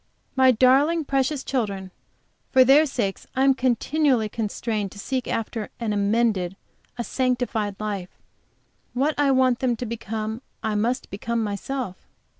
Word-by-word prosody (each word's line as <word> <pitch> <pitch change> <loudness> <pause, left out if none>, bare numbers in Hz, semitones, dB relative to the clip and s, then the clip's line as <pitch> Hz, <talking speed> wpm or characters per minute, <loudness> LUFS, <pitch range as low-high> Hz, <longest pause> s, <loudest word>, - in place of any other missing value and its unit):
My 260 0 +6
darling, 275 +7 +4
precious 275 0 0
children! 200 -7 -2 0.6
For 260 - +7
their 285 +4 +6
sakes 215 -8 -3
I 260 - +2
am 270 0 +6
continually 260 -1 +1
constrained 215 -2 -2
to - - -13
seek 255 +4 -3
after 225 -1 -3
an 225 -3 -1
amended, 205 -3 +1 0.4
a 240 - -2
sanctified 245 -5 -1
life; 200 -4 -3 0.9
what 280 +5 +2
I 290 -1 +4
want 260 -2 +3
them 250 -2 +1
to 245 - -5
become 220 0 -4 0.2
I 220 - 0
must 235 +5 -1
become 230 +3 -2
myself. 205 0 -3
235 Hz, 140 wpm, -24 LUFS, 210-260 Hz, 0.9 s, For